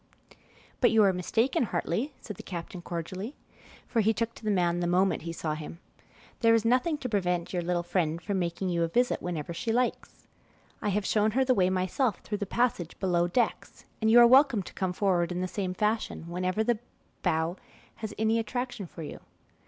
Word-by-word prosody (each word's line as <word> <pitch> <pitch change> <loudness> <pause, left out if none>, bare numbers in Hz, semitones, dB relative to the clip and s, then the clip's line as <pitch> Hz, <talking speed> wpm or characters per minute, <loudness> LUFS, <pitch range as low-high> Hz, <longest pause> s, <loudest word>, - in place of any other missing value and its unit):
"But 245 - +5
you 220 -1 +5
are 195 -2 +4
mistaken, 225 +8 +1
Hartley," 220 - -1
said 210 - -8
the - - -7
captain 175 0 -7
cordially, 185 - -5 0.5
for 230 - +1
he 220 +1 +2
took 230 +2 -1
to - - -15
the 215 - -1
man 175 -3 +2
the 175 - 0
moment 185 +2 +2
he 165 - -5
saw 160 -2 -3
him. 155 +2 -7 0.6
"There 230 -1 +5
is 225 -1 +1
nothing 255 +7 +2
to 265 - -4
prevent 180 -6 -1
your 180 - 0
little 175 0 -1
friend 170 -2 0
from 195 +2 -2
making 175 +2 -2
you 170 -1 0
a 165 - +2
visit 245 +9 +1
whenever 170 -2 -4
she 225 +7 -2
likes. 245 +1 -1 0.6
I - - 0
have 205 0 0
shown 215 +2 +2
her 265 - +4
the 255 - +4
way 185 -5 +3
myself 185 +6 0
through 210 -1 -4
the 205 - -3
passage 230 -8 0
below 175 -2 +2
decks, 235 +7 -1 0.2
and 220 - +3
you 235 +2 +8
are 240 - +9
welcome 260 -4 +5
to - - -11
come 190 -2 -1
forward 180 -2 +1
in 180 0 -2
the 185 - -1
same 185 0 -3
fashion 210 -4 -1
whenever 185 +4 -1
the 235 -1 +1 0.4
bow 160 +3 0 0.4
has 220 -2 -5
any 220 +1 +2
attraction 245 -2 -3
for 165 - -9
you. - - -7
195 Hz, 205 wpm, -28 LUFS, 175-230 Hz, 0.6 s, are